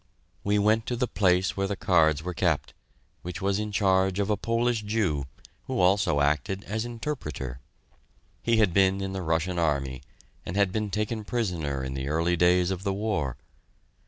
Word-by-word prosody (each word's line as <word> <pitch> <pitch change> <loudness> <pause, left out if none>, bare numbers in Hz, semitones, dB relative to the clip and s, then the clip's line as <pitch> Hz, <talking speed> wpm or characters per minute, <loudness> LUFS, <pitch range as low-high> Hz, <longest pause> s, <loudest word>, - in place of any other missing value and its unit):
We 100 +1 +2
went 110 +2 +2
to 125 - -1
the 125 +1 0
place 95 -2 +2
where 100 0 0
the 100 - -2
cards 80 -5 +3
were 90 0 -3
kept, 80 -7 0 0.5
which 90 -1 -6
was 100 +1 0
in 105 0 -3
charge 95 -2 +2
of 100 +1 0
a - - +3
Polish 115 +2 0
Jew, 105 -10 0 0.4
who - - -2
also 90 -5 +3
acted 75 +7 0
as 110 +3 -3
interpreter. 110 - -5 0.8
He 115 -1 +2
had 105 -6 +3
been 95 0 +3
in 95 0 -3
the 95 - -3
Russian 85 +1 0
Army, 70 -5 0 0.4
and 85 - -6
had 100 -2 +3
been 105 0 -2
taken 105 +2 -2
prisoner 85 - -2
in 65 0 -4
the 65 0 -4
early 85 +3 +1
days 90 +1 +3
of 95 -1 -3
the 100 0 -1
war. 95 - -1
95 Hz, 180 wpm, -27 LUFS, 80-105 Hz, 0.8 s, cards